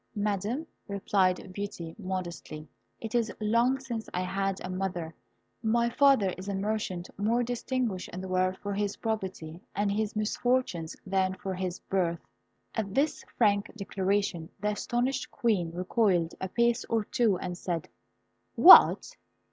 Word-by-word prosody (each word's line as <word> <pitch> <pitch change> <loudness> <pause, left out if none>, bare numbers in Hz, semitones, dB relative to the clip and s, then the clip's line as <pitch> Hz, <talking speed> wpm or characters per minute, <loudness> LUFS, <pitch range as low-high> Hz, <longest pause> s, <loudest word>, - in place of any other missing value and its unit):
"Madam," 210 +7 -1 0.2
replied 190 -2 0
Beauty, 190 -5 -5
modestly, 175 -5 -5 0.3
"it 225 -1 -6
is 235 -3 +1
long 235 +5 +2
since 235 -4 -5
I 180 - 0
had 195 +1 -1
a - - -4
mother; 185 -3 -3 0.5
my 235 +1 +2
father 265 -9 +4
is 190 - -8
a 200 - -1
merchant 195 -3 -2
more 230 +4 +2
distinguished 240 -4 -2
in 180 - -7
the 190 - -6
world 185 0 +1
for 205 0 -4
his 200 0 -1
probity 190 -7 -4
and 205 0 +1
his 215 +1 -1
misfortunes 215 -5 0
than 190 -1 +1
for 190 0 -5
his 185 -1 -3
birth." 170 -3 -1 0.5
At 205 -3 -3
this 290 +1 +1
frank 205 -3 +3
declaration, 195 -4 -1
the 210 - 0
astonished 240 +5 -1
Queen 205 -8 0
recoiled 180 -1 +1
a 190 - -3
pace 235 +3 +2
or 225 -2 0
two, 235 -9 +2
and 180 0 -5
said, 170 -2 -3 0.7
"What! - - +8
200 Hz, 145 wpm, -29 LUFS, 185-225 Hz, 0.7 s, What